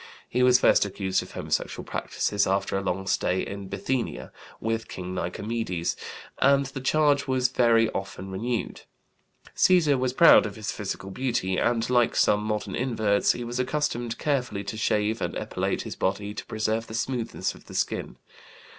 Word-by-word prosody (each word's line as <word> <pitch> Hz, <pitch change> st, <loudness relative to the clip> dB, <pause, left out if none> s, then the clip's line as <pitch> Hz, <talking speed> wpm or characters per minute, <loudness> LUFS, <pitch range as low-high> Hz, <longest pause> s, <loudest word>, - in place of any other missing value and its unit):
He 125 Hz, -, 0 dB
was 125 Hz, 0 st, +6 dB
first -, -, +5 dB
accused 95 Hz, -1 st, -1 dB
of -, -, -11 dB
homosexual -, -, -2 dB
practices 100 Hz, -1 st, -1 dB
after 95 Hz, +1 st, 0 dB
a 95 Hz, -, 0 dB
long 95 Hz, 0 st, -2 dB
stay 95 Hz, -1 st, +1 dB
in 100 Hz, -1 st, -6 dB
Bithynia 115 Hz, +6 st, -3 dB, 0.3 s
with 115 Hz, 0 st, -2 dB
King 90 Hz, 0 st, -6 dB
Nikomedes, 90 Hz, -1 st, -2 dB, 0.4 s
and 140 Hz, 0 st, +4 dB
the 135 Hz, 0 st, -6 dB
charge 145 Hz, 0 st, +2 dB
was 130 Hz, -1 st, +2 dB
very 115 Hz, -2 st, +4 dB
often 95 Hz, 0 st, -5 dB
renewed. 115 Hz, +5 st, -3 dB, 0.7 s
Cæsar 155 Hz, -7 st, +4 dB
was 125 Hz, 0 st, 0 dB
proud 165 Hz, -5 st, +7 dB
of 100 Hz, -, -8 dB
his 105 Hz, -1 st, -4 dB
physical 100 Hz, -1 st, -5 dB
beauty, 115 Hz, -6 st, -1 dB
and, 115 Hz, -1 st, +1 dB
like 120 Hz, -1 st, +2 dB
some 105 Hz, -, +3 dB
modern 105 Hz, -2 st, -2 dB
inverts, 110 Hz, -5 st, +2 dB
he 120 Hz, -, -5 dB
was 120 Hz, +1 st, -4 dB
accustomed 125 Hz, -3 st, -1 dB
carefully 125 Hz, -9 st, -1 dB
to 100 Hz, +2 st, -5 dB
shave 110 Hz, 0 st, 0 dB
and -, -, -2 dB
epilate -, -, -2 dB
his -, -, -6 dB
body 100 Hz, +2 st, -2 dB
to 105 Hz, -, -7 dB
preserve 110 Hz, +1 st, -1 dB
the 110 Hz, -, -7 dB
smoothness 120 Hz, -1 st, -2 dB
of -, -, -17 dB
the -, -, -11 dB
skin. -, -, -2 dB
115 Hz, 165 wpm, -26 LUFS, 100-125 Hz, 0.7 s, proud